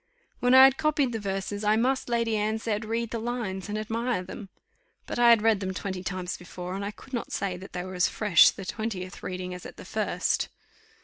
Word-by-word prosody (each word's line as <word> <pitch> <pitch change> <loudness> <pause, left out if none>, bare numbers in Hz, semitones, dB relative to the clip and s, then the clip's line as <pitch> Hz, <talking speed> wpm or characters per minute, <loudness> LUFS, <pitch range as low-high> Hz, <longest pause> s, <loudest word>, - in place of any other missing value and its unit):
When 245 +1 +4
I 260 - +11
had 270 0 +6
copied 305 -4 +1
the 225 - -3
verses 200 +1 -3
I 210 +1 +4
must, 255 +3 +1
Lady 230 -2 +1
Anne 215 +1 0
said, 220 -1 -2
read 230 +1 -2
the 230 - -2
lines, 220 -5 -3
and 210 - -2
admire 225 -1 -1
them. 195 +2 -9 0.6
But - - -4
I 240 0 +7
had 230 -2 +6
read 225 -3 +4
them 190 -1 -3
twenty 190 -1 -4
times 180 0 -4
before, 180 0 -7
and 195 +1 -3
I 200 - -2
could 255 +5 -14
not 240 - -3
say 195 -2 -2
that 190 +2 -11
they 180 - -3
were 185 +1 -7
as 180 -1 +3
fresh 205 -7 +6
the 195 - -7
twentieth 195 -3 -4
reading 185 0 -5
as 180 - -8
at - - -10
the - - -10
first. - - 0
210 Hz, 230 wpm, -27 LUFS, 185-235 Hz, 0.6 s, I